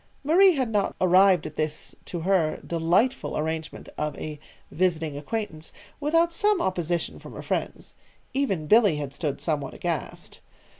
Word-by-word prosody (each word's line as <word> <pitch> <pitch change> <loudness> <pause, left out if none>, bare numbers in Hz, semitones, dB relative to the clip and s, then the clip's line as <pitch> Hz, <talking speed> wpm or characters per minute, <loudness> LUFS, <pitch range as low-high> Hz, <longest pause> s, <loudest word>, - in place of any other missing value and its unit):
Marie 360 +6 +6
had 260 -5 -1
not 205 -2 0
arrived 185 -1 +5
at 155 0 -8
this 155 0 -3
to 175 - -5
her, 175 -3 +1
delightful 175 +10 +1
arrangement 160 0 -4
of 150 -1 -2
a 150 -1 -6 0.3
"visiting 165 -4 0
acquaintance" 160 0 -5 0.3
without 330 +3 +2
some 415 +2 +2
opposition 175 - -1
from - - -11
her - - -8
friends. - - -3 0.4
Even 200 - 0
Billy 210 -1 +5
had 145 -2 -5
stood 145 -1 -3
somewhat 145 -4 -2
aghast. - - -4
175 Hz, 145 wpm, -26 LUFS, 155-225 Hz, 0.4 s, Marie